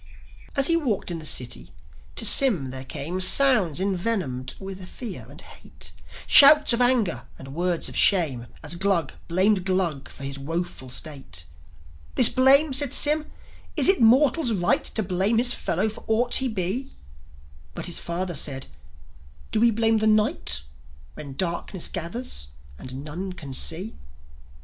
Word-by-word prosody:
As 275 Hz, -1 st, +4 dB
he 335 Hz, -, +5 dB
walked 245 Hz, -, -2 dB
in 170 Hz, -, -5 dB
the 155 Hz, -, -6 dB
city, 120 Hz, -, -2 dB, 0.5 s
to -, -, 0 dB
Sym 185 Hz, -, +5 dB
there 130 Hz, 0 st, -8 dB
came 155 Hz, +7 st, -5 dB
Sounds 210 Hz, -, +5 dB
envenomed 180 Hz, -, -3 dB
with 190 Hz, -1 st, -9 dB
fear 235 Hz, -6 st, -8 dB
and -, -, -14 dB
hate, -, -, -11 dB, 0.3 s
Shouts 295 Hz, -1 st, +7 dB
of 235 Hz, -, 0 dB
anger 225 Hz, -, +1 dB
and 135 Hz, 0 st, -11 dB
words 175 Hz, +1 st, -2 dB
of -, -, -10 dB
shame, 145 Hz, -11 st, +2 dB, 0.2 s
As 150 Hz, +2 st, 0 dB
Glug 175 Hz, -4 st, 0 dB
blamed 185 Hz, +3 st, +1 dB
Glug 180 Hz, -7 st, -2 dB
for 140 Hz, -, -12 dB
his 140 Hz, 0 st, -6 dB
woeful 165 Hz, -2 st, -6 dB
state. 135 Hz, -, -8 dB, 0.7 s
"This -, -, +8 dB
blame?" 270 Hz, +3 st, +4 dB
said 280 Hz, 0 st, -1 dB
Sym, 300 Hz, +1 st, +3 dB, 0.5 s
"Is -, -, +5 dB
it 385 Hz, -5 st, +5 dB
mortal's 255 Hz, +3 st, +3 dB
right 175 Hz, -4 st, 0 dB
To 220 Hz, -, -1 dB
blame 190 Hz, +4 st, +1 dB
his 245 Hz, +1 st, +2 dB
fellow 190 Hz, +6 st, -2 dB
for 215 Hz, -, -8 dB
aught 240 Hz, +3 st, 0 dB
he 265 Hz, -, +3 dB
be?" 220 Hz, +5 st, -4 dB, 0.8 s
But -, -, -6 dB
the 175 Hz, -, -3 dB
father 175 Hz, +2 st, -4 dB
said, 135 Hz, -3 st, -2 dB, 0.9 s
"Do 220 Hz, -, 0 dB
we 235 Hz, +1 st, +4 dB
blame 225 Hz, 0 st, +1 dB
the 215 Hz, -, 0 dB
night 210 Hz, -, 0 dB, 0.5 s
When 140 Hz, -3 st, -10 dB
darkness 175 Hz, +2 st, -3 dB
gathers 170 Hz, -, -4 dB, 0.3 s
and 130 Hz, +2 st, -9 dB
none 180 Hz, +5 st, -6 dB
can 150 Hz, -6 st, -10 dB
see?" 175 Hz, +10 st, -2 dB
185 Hz, 155 wpm, -23 LUFS, 155-230 Hz, 0.9 s, This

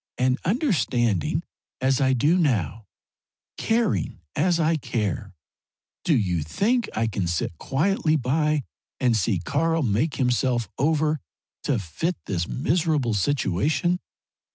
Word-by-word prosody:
And 130 Hz, +1 st, +2 dB
understanding 125 Hz, -, +1 dB, 0.4 s
as 130 Hz, +1 st, +2 dB
I 130 Hz, -1 st, +3 dB
do 150 Hz, +9 st, +3 dB
now 110 Hz, -, 0 dB, 0.7 s
caring 225 Hz, -, 0 dB, 0.2 s
as 170 Hz, +2 st, +2 dB
I 165 Hz, 0 st, +3 dB
care 110 Hz, -, -3 dB, 0.7 s
do 155 Hz, -6 st, +3 dB
you 90 Hz, -7 st, 0 dB
think 225 Hz, -, 0 dB
I 110 Hz, -, +1 dB
can 100 Hz, -5 st, -2 dB
sit 85 Hz, 0 st, -2 dB
quietly 155 Hz, +2 st, +1 dB
by 150 Hz, +2 st, +1 dB, 0.4 s
and 125 Hz, -3 st, +3 dB
see 105 Hz, -1 st, +1 dB
Karl 160 Hz, -, 0 dB
make 120 Hz, +7 st, +1 dB
himself 125 Hz, -2 st, +1 dB
over 155 Hz, +1 st, +2 dB, 0.5 s
to 140 Hz, -, +2 dB
fit 110 Hz, -, -2 dB
this 85 Hz, -3 st, -2 dB
miserable 150 Hz, -4 st, +1 dB
situation? 145 Hz, -, +1 dB
135 Hz, 120 wpm, -25 LUFS, 110-160 Hz, 0.7 s, I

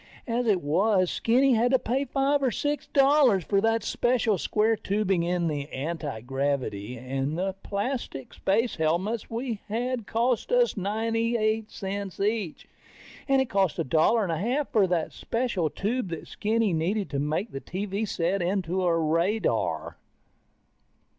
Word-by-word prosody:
As 240 Hz, 0 st, -1 dB
it 195 Hz, -6 st, +2 dB
was, 185 Hz, +5 st, +2 dB
Skinny 255 Hz, +3 st, +3 dB
had 235 Hz, +2 st, +3 dB
to -, -, +7 dB
pay 260 Hz, +3 st, -1 dB
five 280 Hz, +1 st, +1 dB
or 265 Hz, -, +2 dB
six 290 Hz, +5 st, -2 dB
dollars 275 Hz, -, +4 dB
for 200 Hz, +2 st, +1 dB
that 225 Hz, +1 st, +1 dB
special 240 Hz, -5 st, +1 dB
square 220 Hz, +5 st, +2 dB
tubing 195 Hz, -3 st, 0 dB
in 175 Hz, 0 st, 0 dB
the 145 Hz, -2 st, -3 dB
antigravity, 135 Hz, -5 st, -3 dB
and 135 Hz, +5 st, -3 dB
the 190 Hz, +1 st, -1 dB
plastic 200 Hz, -, -4 dB
space 225 Hz, +4 st, 0 dB
helmets 175 Hz, +8 st, 0 dB
we 230 Hz, -1 st, -3 dB
had 235 Hz, +1 st, -2 dB
cost 235 Hz, -, 0 dB
us -, -, +3 dB
ninety 225 Hz, +3 st, 0 dB
eight 215 Hz, 0 st, 0 dB
cents 195 Hz, -1 st, -5 dB
each. 205 Hz, -4 st, -2 dB, 0.6 s
And 270 Hz, -1 st, +4 dB
it 255 Hz, -, -10 dB
cost 195 Hz, -5 st, +1 dB
a -, -, 0 dB
dollar 165 Hz, -, +3 dB
and 185 Hz, -, -1 dB
a 165 Hz, -, -1 dB
half 255 Hz, +9 st, -1 dB
for 205 Hz, -4 st, +4 dB
the 175 Hz, -3 st, 0 dB
special 230 Hz, -9 st, -1 dB
tube 225 Hz, +6 st, -2 dB
that 165 Hz, -2 st, -6 dB
Skinny 220 Hz, -2 st, 0 dB
needed 185 Hz, +6 st, 0 dB
to 140 Hz, -, -1 dB
make 155 Hz, +9 st, -1 dB
the 135 Hz, -, -6 dB
TV 200 Hz, +3 st, -3 dB
set 180 Hz, +1 st, 0 dB
into 185 Hz, 0 st, 0 dB
a 170 Hz, -2 st, +2 dB
radar. 165 Hz, +7 st, 0 dB
200 Hz, 155 wpm, -27 LUFS, 170-230 Hz, 0.6 s, to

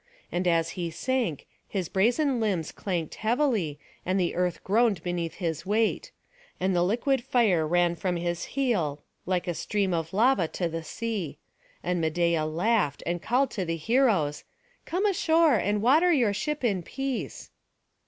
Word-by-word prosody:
And 180 Hz, +1 st, -1 dB
as 165 Hz, -1 st, +2 dB
he 175 Hz, -1 st, -3 dB
sank, 235 Hz, -, -2 dB, 0.2 s
his 190 Hz, -4 st, -3 dB
brazen 245 Hz, -, +2 dB
limbs 190 Hz, -8 st, -1 dB
clanked 175 Hz, -5 st, -3 dB
heavily, 220 Hz, -, +1 dB, 0.3 s
and 185 Hz, +2 st, 0 dB
the 175 Hz, -2 st, 0 dB
earth 180 Hz, -1 st, -1 dB
groaned 220 Hz, 0 st, +2 dB
beneath 175 Hz, -2 st, -3 dB
his 165 Hz, -5 st, -3 dB
weight; 215 Hz, -, 0 dB, 0.5 s
and 185 Hz, 0 st, +1 dB
the 175 Hz, -, +3 dB
liquid 240 Hz, +7 st, +1 dB
fire 210 Hz, -11 st, +2 dB
ran 175 Hz, +1 st, +2 dB
from 180 Hz, +1 st, -2 dB
his 170 Hz, 0 st, -2 dB
heel, 175 Hz, -, 0 dB, 0.2 s
like 180 Hz, 0 st, 0 dB
a 175 Hz, -, 0 dB
stream 195 Hz, +2 st, -1 dB
of 165 Hz, -1 st, -2 dB
lava 215 Hz, -3 st, +3 dB
to 175 Hz, +2 st, -2 dB
the 165 Hz, 0 st, -4 dB
sea; 205 Hz, -7 st, -4 dB, 0.5 s
and 180 Hz, -1 st, 0 dB
Medeia 165 Hz, 0 st, +1 dB
laughed, 170 Hz, -1 st, 0 dB
and 175 Hz, 0 st, -2 dB
called 260 Hz, +7 st, +1 dB
to 195 Hz, -, -2 dB
the 165 Hz, -1 st, -2 dB
heroes, 195 Hz, -, +2 dB, 0.4 s
"Come 370 Hz, +5 st, -1 dB
ashore, 330 Hz, -5 st, +3 dB
and 205 Hz, +1 st, 0 dB
water 315 Hz, +9 st, +5 dB
your 240 Hz, -10 st, +3 dB
ship 300 Hz, +7 st, -3 dB
in 200 Hz, -7 st, +1 dB
peace." 270 Hz, +7 st, -5 dB
190 Hz, 160 wpm, -27 LUFS, 170-240 Hz, 0.5 s, water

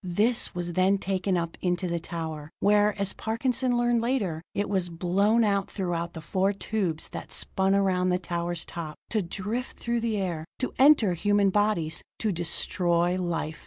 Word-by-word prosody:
This 210 Hz, +6 st, +2 dB
was 175 Hz, -1 st, -3 dB
then 185 Hz, +3 st, +3 dB
taken 190 Hz, -1 st, -1 dB
up 170 Hz, -1 st, -4 dB
into 180 Hz, 0 st, 0 dB
the 170 Hz, -1 st, -1 dB
tower, 160 Hz, -3 st, -5 dB
where, 210 Hz, 0 st, +3 dB
as 200 Hz, -1 st, 0 dB
Parkinson 245 Hz, +2 st, 0 dB
learned 240 Hz, -1 st, +2 dB
later, 215 Hz, -10 st, -1 dB
it 205 Hz, +1 st, 0 dB
was 190 Hz, -3 st, 0 dB
blown 195 Hz, +7 st, +2 dB
out 200 Hz, -2 st, +1 dB
through 180 Hz, -4 st, -2 dB, 0.2 s
the 160 Hz, -, -7 dB
four 190 Hz, +5 st, +1 dB
tubes 195 Hz, -6 st, -2 dB
that -, -, -8 dB
spun 190 Hz, +1 st, 0 dB
around 185 Hz, -2 st, +2 dB
the 180 Hz, -, +2 dB
tower's 175 Hz, -1 st, -3 dB
top, 160 Hz, -3 st, -6 dB, 0.2 s
to 220 Hz, -, +2 dB
drift 205 Hz, +8 st, -4 dB
through 235 Hz, 0 st, -1 dB
the 225 Hz, -2 st, -1 dB
air 175 Hz, -5 st, -2 dB
to 255 Hz, -, -3 dB
enter 265 Hz, -9 st, +6 dB
human 205 Hz, +2 st, +2 dB
bodies 185 Hz, -6 st, +1 dB, 0.2 s
to 215 Hz, -, 0 dB
destroy 175 Hz, 0 st, +1 dB
life. 165 Hz, -3 st, -3 dB
190 Hz, 170 wpm, -27 LUFS, 175-210 Hz, 0.2 s, enter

